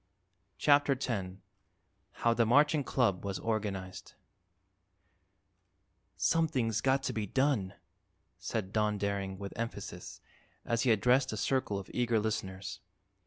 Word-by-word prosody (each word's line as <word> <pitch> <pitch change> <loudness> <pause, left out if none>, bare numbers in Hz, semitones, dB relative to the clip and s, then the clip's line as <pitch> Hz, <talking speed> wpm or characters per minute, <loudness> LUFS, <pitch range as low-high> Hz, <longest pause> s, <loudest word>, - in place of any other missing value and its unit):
CHAPTER 145 -1 +4
X 105 -8 -3 0.9
HOW 115 - +4
THE 115 - +3
MARCHING 145 +4 +4
CLUB 120 -9 +1
WAS 100 -1 -3
ORGANIZED 100 -4 -4 2.0
"Something's 130 -9 +1
got 135 0 +2
to - - -2
be 105 -2 -2
done," 125 -6 +1 0.6
said 105 -3 -3
Don 105 -1 +1
Daring, 100 -1 -2
with 100 0 -7
emphasis, 115 +1 -6 0.5
as 115 0 0
he 125 - +3
addressed 125 +5 +3
a - - -4
circle 130 -7 0
of 100 -1 -6
eager 120 -2 +2
listeners. 100 -3 -3
110 Hz, 120 wpm, -31 LUFS, 100-130 Hz, 2.0 s, CHAPTER